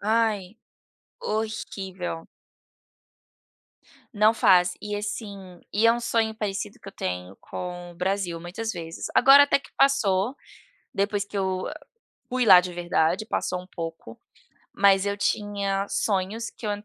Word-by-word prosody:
Ai, 215 -2 0 0.6
horrível. 195 - -4 1.9
Não 215 +1 +5
faz. 180 -4 +4
E, 210 0 -4
assim, 200 -4 -6
e 215 +3 +3
é 230 - +7
um 240 - -2
sonho 225 -2 0
parecido 205 -1 -4
que - - -11
eu 195 - -10
tenho 90 +1 -5
com 175 -1 -7
o - - -18
Brasil 180 -1 -2
muitas 220 +6 -4
vezes. 165 -2 -6
Agora 275 +3 +8
até 285 - +2
que 275 - -17
passou, 245 -4 +3 0.6
depois 200 +1 0
que 205 - -8
eu 190 -1 -1 0.7
fui 250 -1 +1
lá 185 -3 +9
de 180 0 -6
verdade, 175 +2 +1
passou 180 -4 -2
um 180 - -15
pouco, 165 -10 -7 0.5
mas 195 -1 +4
eu 200 0 -1
tinha 200 -1 -1
sonhos 210 +3 -1
que 225 - -11
eu - - 0
200 Hz, 140 wpm, -25 LUFS, 180-220 Hz, 1.9 s, lá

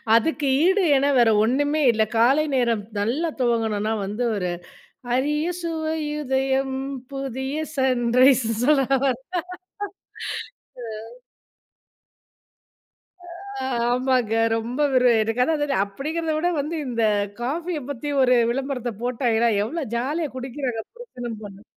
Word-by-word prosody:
அதுக்கு 290 +5 +1 0.2
ஈடு 380 +2 +4
என 270 +1 +3
வேற 235 -2 +5
ஒண்ணுமே 290 +6 +1
இல்ல. 220 -1 +2
காலை 265 +7 +4
நேரம் 235 -4 +1 0.2
நல்லா 260 +11 0
துவங்கணும்னா 225 -3 +1
வந்து, 210 +5 -3
ஒரு 180 -3 -1 0.6
அரிய 300 +4 +1
சுவையுதயம் 295 -5 -1 0.4
புதிய 270 +1 -4 0.2
சன்ரைஸ்னு 250 -2 +3
சொல்ல 275 -1 +4 0.2
வரேன். 260 -2 0 1.8
ஆ. - - -11 2.6
ஆ, - - -2 0.3
ஆமாங்க. 250 -3 +1 0.2
ரொம்ப 235 +4 -4 0.2
ஒரு 250 -1 +5
எனக்கு 225 +3 0
அதான் 315 +3 +1
அதாவது 290 -1 0
அப்படிங்கிறத 310 +10 -3
விட 345 +3 +1
வந்து, 300 +4 -2
இந்த 235 -2 -2 0.4
காஃபிய 320 +6 -2
பத்தி 285 +1 -4
ஒரு 250 -1 +5 0.2
விளம்பரத்த 260 -1 -2
போட்டாய்ங்கன்னா, 235 -2 +1
எவ்வளோ 305 +7 -3
ஜாலியா 295 +5 -1
குடிக்கிறாங்க 255 -2 -3
புருஷனும் 245 - -7
பொண்ணும். 200 0 -11
260 Hz, 110 wpm, -23 LUFS, 235-295 Hz, 2.6 s, வேற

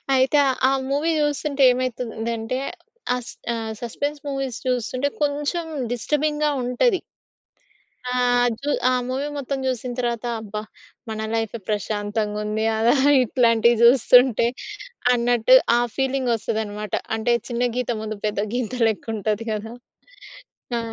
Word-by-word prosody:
అయితే, 265 +3 +3 0.3
ఆ - - +2 0.2
మూవీ 295 +4 +1
చూస్తుంటేమైతుందంటే, 255 -5 0 0.6
అస్ 245 - -8 0.2
ఆహ్, 225 -1 -4
సస్పెన్స్ 285 +5 -3
మూవీస్ 270 -3 -3
చూస్తుంటే, 250 +3 0
కొంచెం 295 +4 -1 0.3
డిస్టర్బింగ్‌గా 300 +4 0
ఉంటది. 300 - +2 1.1
ఆహ్, 245 -1 +3
జూ 290 - -3 0.2
ఆ - - +2 0.2
మూవీ 265 +3 -2
మొత్తం 275 0 -3
చూసిన 250 -1 -2
తర్వాత 240 -1 -2 0.2
అబ్బా! 210 0 -5 0.5
మన 220 0 -4
లైఫే 225 0 -2
ప్రశాంతంగా 210 0 -2
ఉంది. 215 +1 -1
అలా 230 +2 +4 0.3
ఇట్లాంటివి 235 -1 +3
జూస్తుంటే, 245 -1 +6 0.7
అన్నట్టు 245 +1 +4 0.2
ఆ - - +3 0.2
ఫీలింగొస్తదన్నమాట. 225 -6 -2 0.2
అంటే 225 +2 +1 0.2
చిన్న 245 +1 0
గీత 250 -1 -1
ముందు 215 -1 -5
పెద్ద 210 -1 -1
గీత 245 -3 -2 0.2
లెక్కుంటది 215 0 -2
కదా! 220 +2 -4 1.0
ఆ! - - 0
245 Hz, 110 wpm, -23 LUFS, 220-265 Hz, 1.1 s, జూస్తుంటే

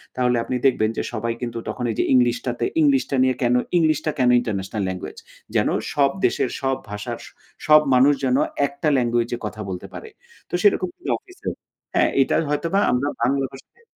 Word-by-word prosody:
তাহলে 125 -1 +1
আপনি 130 - -3
দেখবেন 115 -5 +3
যে, - - -1
সবাই 115 +1 -2
কিন্তু 120 -1 -4
তখন 125 - -4
এই - - -5
যে, - - +3
ইংলিশটা 125 0 +2
তে 120 - +1 0.2
ইংলিশটা 140 -2 +2
নিয়ে 130 0 +2
কেন 120 0 +3 0.2
ইংলিশটা 155 -1 +2
কেন 125 -1 +4
ইন্টারন্যাশনাল 105 -3 -3
ল্যাঙ্গুয়েজ? 95 0 -6 0.4
যেন - - +3 0.2
সব 140 -1 +3
দেশের - - +1
সব 135 0 +1 0.2
ভাষার 105 0 -5 0.5
সব 155 0 +8
মানুষ 130 +3 +6
যেন 130 0 +2 0.3
একটা 140 +2 -4
ল্যাঙ্গুয়েজে 120 -1 0
কথা 105 0 -5
বলতে 90 -1 -6
পারে। 450 - -8 0.4
তো - - -22
সেরকমই 370 -3 +1
অফিসের। 370 -2 -7 0.4
হ্যাঁ, - - +3
এইটার 135 - +2
হয়তোবা 165 +6 0
আমরা 125 +4 0
বাংলা 135 +3 +1
ভাষায় 135 - -16
130 Hz, 170 wpm, -22 LUFS, 120-145 Hz, 0.5 s, সব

